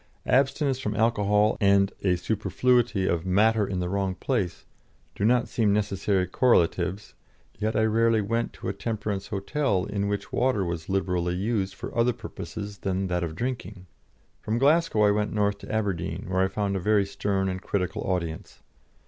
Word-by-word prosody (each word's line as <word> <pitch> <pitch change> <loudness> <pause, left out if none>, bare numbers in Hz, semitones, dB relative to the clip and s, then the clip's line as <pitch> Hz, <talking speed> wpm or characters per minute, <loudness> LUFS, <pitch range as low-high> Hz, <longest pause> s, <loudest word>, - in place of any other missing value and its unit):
Abstinence 135 0 +2
from 105 -5 -3
alcohol 105 -2 +2
and 100 0 +4
a 90 -2 +3
superfluity 110 +3 +1
of 85 -3 0
"matter 105 +3 +3
in 95 - -3
the 90 - -1
wrong 95 0 -1
place" 100 -6 -2 0.5
do - - -4
not 120 +2 +3
seem 110 -3 +1
necessary 100 -2 0
correlatives, 95 -2 +1 0.5
yet 110 +1 -1
I 110 - +3
rarely 115 +1 +3
went 115 +3 -1
to - - -8
a 95 - -1
temperance 105 -2 -3
hotel 100 -1 -1
in 100 -1 -2
which 100 -1 -3
water 125 -6 +1
was 85 -1 -4
liberally 90 -2 0
used 100 0 -1
for - - -7
other 120 +1 +3
purposes 105 -3 -7
than 95 -1 -2
that 90 0 0
of 80 -2 -4
drinking. 110 -6 -4 0.6
From 110 +2 -1
Glasgow 145 -3 +3
I 105 - +5
went 105 0 0
north 100 -1 +1
to - - -9
Aberdeen, 95 -5 -2
where 95 0 +1
I 95 - +3
found 100 0 -2
a - - 0
very 105 +2 +2
stern 100 -1 -1
and 95 0 -3
critical 100 +1 -2
audience. 85 -4 -4
100 Hz, 170 wpm, -26 LUFS, 95-110 Hz, 0.6 s, I